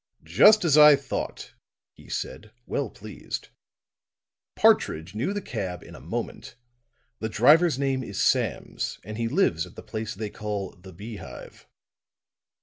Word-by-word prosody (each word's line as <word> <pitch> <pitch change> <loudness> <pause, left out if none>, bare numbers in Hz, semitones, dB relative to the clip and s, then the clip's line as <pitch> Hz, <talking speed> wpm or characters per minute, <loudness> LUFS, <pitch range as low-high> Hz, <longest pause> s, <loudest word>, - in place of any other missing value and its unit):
"Just 215 -3 +6
as 155 -2 +5
I 150 -1 +9
thought," 140 0 -5 0.4
he - - -17
said, 110 - -5 0.2
well 135 -5 -2
pleased. 105 +1 -8 1.1
"Partridge 80 +4 +2
knew 120 - -1
the 205 -1 -3
cab 95 -7 -5
in - - -13
a - - -11
moment. - - -5 0.6
The 110 - -3
driver's 150 +7 +5
name 135 -1 0
is 100 -4 -6
Sams, - - 0
and 110 +1 -7
he 115 - 0
lives 115 - +1
at - - -17
the - - -10
place 110 -2 -5
they 105 +1 -5
call 105 -3 -4
the 95 +2 -14
Beehive." 105 +4 -10
110 Hz, 145 wpm, -26 LUFS, 100-140 Hz, 1.1 s, I